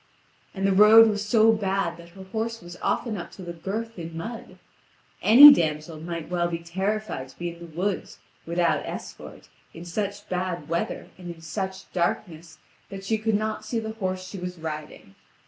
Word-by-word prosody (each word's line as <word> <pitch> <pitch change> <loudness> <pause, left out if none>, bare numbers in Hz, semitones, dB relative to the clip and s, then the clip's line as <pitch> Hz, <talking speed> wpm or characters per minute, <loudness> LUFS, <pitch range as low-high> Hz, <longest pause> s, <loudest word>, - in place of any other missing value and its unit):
And 195 0 -1
the 195 - +3
road 215 +3 +8
was 205 -1 -2
so 220 +1 +4
bad 195 -5 -1
that 170 0 -13
her 190 - -9
horse 225 +4 -4
was 175 0 -11
often 225 -4 -1
up 170 -1 -7
to 190 - -10
the 170 -1 -6
girth 205 +5 -5
in 165 -1 -7
mud; 225 +7 -7 0.6
any 280 +7 +11
damsel 155 - -2
might 170 0 -5
well 175 -1 +1
be 170 -1 -3
terrified 190 -3 -3
to - - -18
be 175 0 -3
in 170 - -16
the 170 - -9
woods, 180 +4 -3 0.3
without 170 0 +1
escort, - - -9 0.3
in 165 +1 -9
such 205 +3 -4
bad 180 -4 -3
weather 170 +1 -3
and 175 -1 -7
in 165 - -17
such 190 +3 -5
darkness 170 -3 -2 0.3
that 195 0 -8
she 220 +2 0
could 220 0 +1
not 215 +1 -2
see 235 - -3
the 220 -1 -3
horse 185 -3 -4
she 195 0 -7
was 180 0 -6
riding. 155 -10 -7
185 Hz, 185 wpm, -25 LUFS, 170-210 Hz, 0.6 s, any